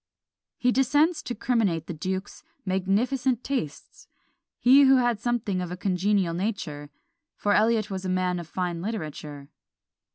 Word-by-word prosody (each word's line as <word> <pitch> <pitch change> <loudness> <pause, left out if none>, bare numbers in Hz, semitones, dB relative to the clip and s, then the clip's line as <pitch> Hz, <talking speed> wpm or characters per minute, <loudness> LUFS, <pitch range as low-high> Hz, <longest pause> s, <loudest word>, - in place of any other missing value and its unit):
He 250 - +2
descends 290 +6 +2
to 245 - -5
criminate 205 -10 0
the 175 - -5
duke's 185 +4 -5 0.2
magnificent 230 +7 0
tastes; 255 - -5 0.5
he 270 +3 +6
who 270 0 +6
had 240 -4 +2
something 220 -6 -1
of 180 - -4
a 180 - -5
congenial 185 -1 +1
nature; 170 -6 -4 0.5
for 205 - 0
Eliot 220 -1 +2
was 190 -1 -4
a 185 - -3
man 185 -1 0
of 170 - -8
fine 175 -1 -3
literature. 150 -8 -6
195 Hz, 140 wpm, -26 LUFS, 180-240 Hz, 0.5 s, he